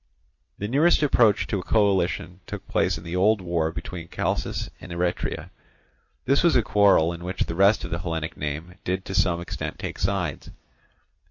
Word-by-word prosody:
The 105 - -3
nearest 150 +7 +3
approach 115 -7 +4
to 100 - -2
a - - -6
coalition 95 -4 +1
took - - -7
place - - +1
in 80 - -10
the 85 0 -5
old 105 +4 +3
war 85 -3 -1
between 85 0 -7
Chalcis - - -2
and - - -10
Eretria; 90 +1 -2 0.7
this 140 +2 +3
was 170 -2 +4
a 120 - +4
quarrel 100 -6 +4
in 85 0 -9
which 90 +1 -5
the - - -4
rest 100 +5 +4
of - - -6
the 85 - -1
Hellenic 80 -2 -3
name 75 +4 -5
did 95 +1 -2
to 95 - -5
some 90 -3 +2
extent 85 - -5
take - - -6
sides. 90 -4 -2
90 Hz, 180 wpm, -25 LUFS, 85-100 Hz, 0.7 s, approach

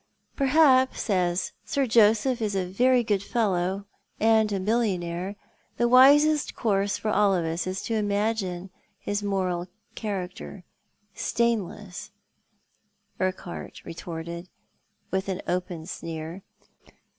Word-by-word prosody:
"Perhaps, 265 -4 +3
as 180 -1 +1
Sir 280 -1 0
Joseph 230 +2 +3
is 210 -2 -1
a 190 -1 0
very 245 +7 +3
good 205 -3 0
fellow, 195 -3 -1 0.3
and 220 -1 +4
a 200 - 0
mil 215 +5 +1
lionaire, 180 -3 -2 0.4
the 240 - +3
wisest 290 +5 +5
cour>se 200 -3 0
for 215 - -1
all 200 -1 +3
of 170 -2 0
us 165 +3 -2
is 185 +1 -3
to 230 - -3
imagine 205 -3 -1 0.3
his 205 +1 -3
moral 185 -3 -1 0.3
character 190 -2 -5 0.5
stainless," 210 -4 -2 1.1
Urquhart 185 -2 -4
retorted, 170 +1 -7 0.6
with 190 +1 -1
an 190 -1 -2
open 180 -2 -2
sneer. 165 +1 -6
200 Hz, 115 wpm, -26 LUFS, 180-225 Hz, 1.1 s, wisest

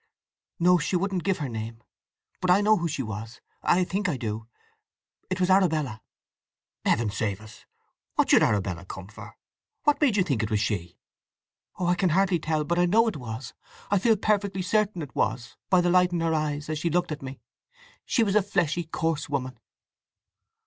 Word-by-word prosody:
"No. 180 +1 +4
She 175 - -1
wouldn't 185 -1 0
give 195 -2 +1
her 145 - -3
name. 115 -1 -6 0.6
But 185 - 0
I 185 +3 +6
know 215 +1 +5
who 170 - -1
she 150 -4 -3
was—I 115 - -2
think 195 +2 -1
I 145 - -1
do! 110 -2 -4 0.8
It 185 0 -2
was 180 0 +2
Arabella!" 155 - +2 0.8
"Heaven 110 -2 +1
save 100 -1 -2
us! 110 -1 -15 0.5
What - - +3
should - - +7
Arabella 95 -4 0
come 95 +1 -9
for? 105 - -12 0.5
What 295 0 +2
made 255 -8 +3
you 190 - +4
think 140 - -1
it 110 - -2
was 105 - +1
she?" 90 -5 -2 0.8
"Oh, 180 - -2
I 175 - +3
can 180 +1 +1
hardly 185 +1 +2
tell. 155 -1 -1
But 170 +3 0
I 175 - +4
know 225 +6 +4
it 220 - -2
was! 125 0 -7 0.4
I 205 - +4
feel 225 +2 +3
perfectly 200 -2 0
certain 205 -3 0
it 140 - -10
was—by 155 +9 0
the 175 0 +2
light 180 0 +4
in 170 -1 -1
her 165 -1 +1
eyes 150 -1 -1
as 155 -1 -2
she 170 - 0
looked 175 0 0
at 150 - -4
me. 135 0 -8 0.6
She 235 - +2
was 200 -3 0
a 210 - +6
fleshy, 175 -4 0
coarse 160 -1 -2
woman." 130 -4 -3
165 Hz, 190 wpm, -26 LUFS, 120-185 Hz, 0.8 s, should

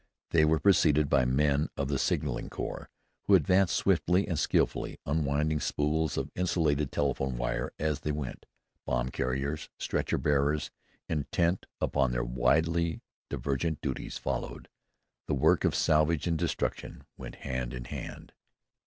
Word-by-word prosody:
They 80 -2 +5
were 80 +1 +3
preceded 75 -6 +4
by 70 -3 +4
men 70 +3 +2
of 70 - -1
the 70 -1 -1
Signaling - - -1
Corps, - - -5 0.4
who 100 - +7
advanced 90 +2 +3
swiftly 95 0 +2
and 85 -6 -1
skillfully, - - 0
unwinding 75 +1 +1
spools 75 +1 0
of 70 +1 -2
insulated 75 -5 +1
telephone 70 -3 -1
wire - - -2
as 75 -2 -1
they 75 - -2
went. 75 -4 -5 0.4
Bomb 60 +1 -1
carriers, 70 +4 -2
stretcher - - -1
bearers, 75 0 +1 0.4
intent 85 +4 0
upon 65 -3 +1
their - - -1
widely 80 +7 +1 0.3
divergent 75 +3 -2
duties, 65 -2 -4
followed. - - -4 0.6
The - - +1
work 65 - +3
of - - +2
salvage 75 +1 +2
and 85 -2 +1
destruction 80 - -2
went - - -9
hand 65 -3 -2
in 60 0 -6
hand. - - -8
75 Hz, 140 wpm, -29 LUFS, 70-80 Hz, 0.6 s, who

